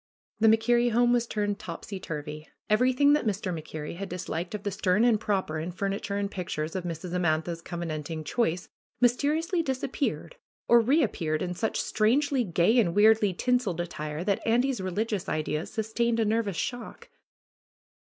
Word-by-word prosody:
The 225 Hz, -, +5 dB
MacKerrie 235 Hz, +2 st, +3 dB
home 240 Hz, +1 st, +4 dB
was 240 Hz, -1 st, +1 dB
turned 205 Hz, -2 st, -2 dB
topsy 185 Hz, +3 st, -7 dB
turvy. 150 Hz, -2 st, -6 dB, 0.2 s
Every 250 Hz, +4 st, +4 dB
thing 285 Hz, +3 st, +4 dB
that 295 Hz, -6 st, +1 dB
Mr. 195 Hz, -3 st, -1 dB
MacKerrie 155 Hz, 0 st, -6 dB
had 195 Hz, 0 st, -5 dB
disliked 175 Hz, +1 st, -4 dB
of 205 Hz, -, -6 dB
the 205 Hz, -, -2 dB
stern 195 Hz, +1 st, +2 dB
and 230 Hz, -3 st, +4 dB
proper 190 Hz, -7 st, -1 dB
in 165 Hz, +3 st, -4 dB
furniture 200 Hz, +2 st, -3 dB
and 200 Hz, 0 st, -2 dB
pictures 165 Hz, -3 st, -4 dB
of 185 Hz, -2 st, -3 dB
Mrs. 170 Hz, +1 st, -5 dB
Amantha's 165 Hz, -1 st, 0 dB
covenanting 165 Hz, -2 st, -5 dB
choice 175 Hz, 0 st, -1 dB, 0.3 s
mysteriously 300 Hz, +8 st, +2 dB
disappeared 260 Hz, -, -3 dB, 0.3 s
or 235 Hz, -, +7 dB
reap 265 Hz, +2 st, +3 dB
peared 155 Hz, -1 st, -1 dB
in 180 Hz, -1 st, -3 dB
such 220 Hz, +5 st, -2 dB
strangely 260 Hz, +5 st, +2 dB
gay 185 Hz, +5 st, +3 dB
and 170 Hz, -7 st, +2 dB
weirdly 215 Hz, -1 st, +5 dB
tinseled 225 Hz, -2 st, 0 dB
attire 155 Hz, -2 st, -4 dB
that 200 Hz, 0 st, 0 dB
Andy's 245 Hz, 0 st, +1 dB
religious 200 Hz, +1 st, -2 dB
ideas 155 Hz, +1 st, -2 dB
sustained 230 Hz, +1 st, 0 dB
a 225 Hz, -, +2 dB
nervous 210 Hz, -4 st, 0 dB
shock. 245 Hz, 0 st, -5 dB
200 Hz, 160 wpm, -27 LUFS, 170-235 Hz, 0.3 s, or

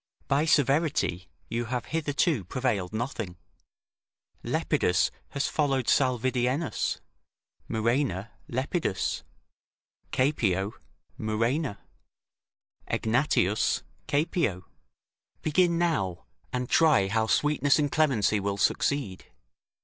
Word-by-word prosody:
By 140 Hz, +3 st, +2 dB
severity 140 Hz, -, +2 dB, 0.2 s
you 120 Hz, +1 st, -2 dB
have 125 Hz, +1 st, -3 dB
hitherto 150 Hz, -, +1 dB
prevailed 110 Hz, -5 st, -1 dB
nothing; 110 Hz, -5 st, -4 dB, 1.1 s
Lepidus 90 Hz, -, +1 dB, 0.2 s
has 140 Hz, -, -1 dB
followed 135 Hz, -4 st, 0 dB
Salvidienus; 130 Hz, +1 st, +1 dB, 0.7 s
Murena, 115 Hz, -2 st, 0 dB, 0.2 s
Lepidus; 130 Hz, -, -1 dB, 0.9 s
Caepio, 105 Hz, -8 st, +1 dB, 0.5 s
Murena; 115 Hz, +3 st, 0 dB, 1.1 s
Egnatius, 110 Hz, -4 st, +1 dB, 0.2 s
Caepio. 145 Hz, -, 0 dB, 0.8 s
Begin 170 Hz, +2 st, +3 dB
now, 145 Hz, -, 0 dB, 0.3 s
and 125 Hz, 0 st, -2 dB
try 150 Hz, -12 st, +4 dB
how 110 Hz, +2 st, +1 dB
sweetness 145 Hz, +2 st, +3 dB
and 145 Hz, -2 st, 0 dB
clemency 115 Hz, -9 st, +2 dB
will 100 Hz, 0 st, -2 dB
succeed. 100 Hz, -1 st, 0 dB
125 Hz, 80 wpm, -28 LUFS, 105-145 Hz, 1.1 s, try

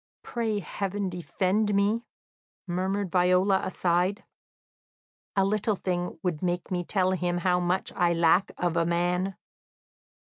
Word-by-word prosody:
"Pray 225 Hz, -3 st, -2 dB
heaven 200 Hz, 0 st, -3 dB
defend 190 Hz, +4 st, 0 dB
me," 210 Hz, +4 st, +1 dB, 0.6 s
murmured 190 Hz, +1 st, -1 dB
Viola 185 Hz, +2 st, +3 dB
aside. 180 Hz, +2 st, 0 dB, 1.1 s
"A 195 Hz, -1 st, +3 dB
little 215 Hz, +2 st, +1 dB
thing 180 Hz, -1 st, -3 dB
would 175 Hz, -5 st, -1 dB
make 175 Hz, 0 st, -2 dB
me 180 Hz, -1 st, 0 dB
tell 185 Hz, 0 st, +1 dB
them 175 Hz, -1 st, -1 dB
how 180 Hz, 0 st, +2 dB
much 180 Hz, +2 st, -1 dB
I 175 Hz, -1 st, +3 dB
lack 170 Hz, +3 st, +3 dB
of 175 Hz, -2 st, 0 dB
a 170 Hz, -, +3 dB
man." 175 Hz, +3 st, 0 dB
185 Hz, 130 wpm, -27 LUFS, 175-195 Hz, 1.1 s, Viola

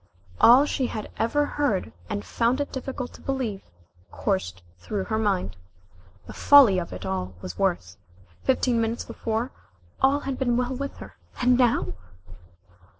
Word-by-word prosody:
All 250 Hz, +5 st, +7 dB
she 265 Hz, -3 st, -1 dB
had 215 Hz, -3 st, -6 dB
ever 290 Hz, +6 st, +1 dB
heard 260 Hz, -, -1 dB, 0.2 s
and 100 Hz, -, -3 dB
found 240 Hz, +3 st, +1 dB
it 285 Hz, -, -2 dB
difficult 260 Hz, -1 st, -5 dB
to -, -, -14 dB
believe, 250 Hz, -8 st, -3 dB, 0.5 s
coursed 90 Hz, -1 st, -2 dB, 0.2 s
through 195 Hz, -, -3 dB
her 220 Hz, +1 st, -2 dB
mind. 190 Hz, -, 0 dB, 0.7 s
The -, -, -9 dB
folly 260 Hz, -10 st, +6 dB
of 170 Hz, -, -6 dB
it 90 Hz, 0 st, -7 dB
all 95 Hz, -1 st, -3 dB
was 90 Hz, -1 st, -8 dB
worse. 170 Hz, -, -1 dB, 0.4 s
Fifteen 255 Hz, -3 st, +1 dB
minutes 225 Hz, +1 st, -2 dB
before 230 Hz, +3 st, -3 dB, 0.5 s
all 275 Hz, +2 st, +3 dB
had 270 Hz, -2 st, -4 dB
been 245 Hz, -3 st, +1 dB
well 250 Hz, +1 st, -1 dB
with 280 Hz, +2 st, -5 dB
her -, -, -11 dB, 0.2 s
and 250 Hz, 0 st, +4 dB
now 240 Hz, -, +2 dB
230 Hz, 150 wpm, -25 LUFS, 185-265 Hz, 0.7 s, All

